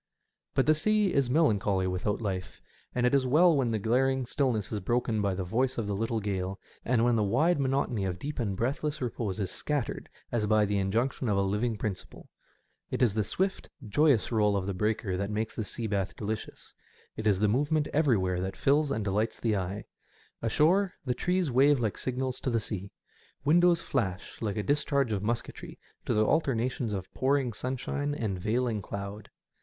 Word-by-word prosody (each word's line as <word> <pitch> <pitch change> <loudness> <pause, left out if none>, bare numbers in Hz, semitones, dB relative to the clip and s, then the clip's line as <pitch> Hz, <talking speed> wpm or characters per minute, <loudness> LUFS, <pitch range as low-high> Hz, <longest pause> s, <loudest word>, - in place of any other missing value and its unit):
But 135 - +3
the 155 - +5
sea 210 +5 +2
is 135 -3 +2
melancholy 105 - +2
without 95 +4 -1
life, 95 -4 -4 0.4
and 125 0 +2
it 125 - +2
is 135 -2 +3
well 165 +5 +5
when 130 -4 +1
the 110 - 0
glaring 130 +5 +1
stillness 120 -6 -1
is 105 - -1
broken 115 +2 0
by 100 -2 0
the 95 - -2
voice 125 +8 0
of 115 - -1
the 100 - -2
little 115 +3 -1
gale, 95 -2 -3 0.2
and 115 -1 +2
when 120 -1 +3
the 110 - +2
wide 145 - +2
monotony 130 -6 0
of 90 -2 -2
deep 145 +9 -5
and 100 -5 -1
breathless 145 +6 -1
repose 110 -5 -3
is 95 -3 -2
scattered 145 -5 -3 0.2
as 110 -3 0
by 110 0 +4
the 100 0 0
injection 115 +6 0
of 100 - +2
a 100 - +3
living 105 +4 0
principle. 105 -3 -6 0.6
It - - 0
is 115 -5 +3
the 110 0 +1
swift, 190 - -2 0.2
joyous 140 +1 +3
roll 105 -3 +3
of 95 - -2
the 100 - -2
breaker 105 -1 -1
that 100 +1 -2
makes 110 +1 -2
the 110 - -2
sea 115 +3 -4
bath 100 -3 -1
delicious; 110 +1 -6 0.4
it 110 - -3
is 100 -3 +4
the 105 - +3
movement 145 +7 +1
everywhere 105 - +2
that 95 +1 -4
fills 145 +2 +3
and 110 -5 -1
delights 105 +3 -1
the 110 -2 +1
eye. 95 +1 -3 0.6
Ashore 175 - +2
the 125 - +1
trees 180 +3 0
wave 135 +3 +5
like 110 -4 -1
signals 130 0 -2
to - - -2
the 115 -2 +1
sea; 100 -2 -5 0.5
windows 170 +3 +4
flash 100 - -3
like 105 -3 -2
a 105 - -1
discharge 140 -2 +1
of 100 -2 -1
musketry 115 +3 -4 0.3
to - - +1
the 110 0 +3
alternations 125 -5 0
of 95 -2 -5
pouring 135 -2 +1
sunshine 135 +4 -3
and 105 -8 -2
veiling 115 +2 0
cloud. 100 +1 -6
115 Hz, 190 wpm, -29 LUFS, 100-135 Hz, 0.6 s, the